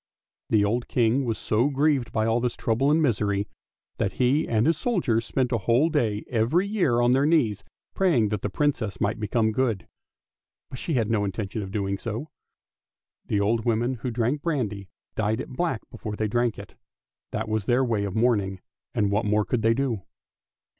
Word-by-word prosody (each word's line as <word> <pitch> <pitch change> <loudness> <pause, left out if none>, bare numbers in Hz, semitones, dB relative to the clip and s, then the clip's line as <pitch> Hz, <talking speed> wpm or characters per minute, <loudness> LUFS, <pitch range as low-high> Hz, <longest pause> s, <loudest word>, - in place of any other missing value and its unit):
The 105 -2 +4
old 120 +4 -1
King 120 +3 +2
was 115 -2 -1
so 115 +6 +1
grieved 140 -3 +1
by 110 0 0
all 115 +1 +2
this 120 0 -1
trouble 120 +5 +1
and 160 +2 +3
misery 100 -6 +1 0.5
that - - 0
he 130 +4 +2
and 110 -1 +2
his 165 +2 +3
soldiers 150 - 0
spent 130 -2 0
a 115 - +1
whole 120 - +3
day 115 -9 0
every 125 - +1
year 175 - +2
on 120 0 +4
their 135 +3 +3
knees 115 - +2 0.3
praying 150 - +2
that 105 -2 -2
the 105 - -2
Princess 110 -6 -1
might 105 +2 0
become 110 +1 +1
good. 115 -5 -1 0.8
But 130 - -7
she 165 - -2
had 115 -3 +1
no 105 -2 +2
intention 100 +2 -3
of 100 - -5
so - - -11
doing. 100 -2 -1 1.3
The 105 - +1
old 110 +2 +1
women 120 +2 +1
who 125 0 -4
drank 120 +5 0
brandy 105 - -2 0.2
dyed 110 0 0
it - - -5
black 130 -3 -2
before 110 -3 -6
they 110 0 -1
drank 120 +1 0
it; - - -10 0.6
that - - -3
was 110 -2 -1
their 125 +2 +3
way 110 -4 0
of 100 -2 -4
mourning, 105 -5 +1 0.4
and 100 -1 +1
what 105 +2 +1
more 105 0 +2
could 125 - -1
they 115 +1 +3
do 125 -6 -1
115 Hz, 190 wpm, -25 LUFS, 105-130 Hz, 1.3 s, The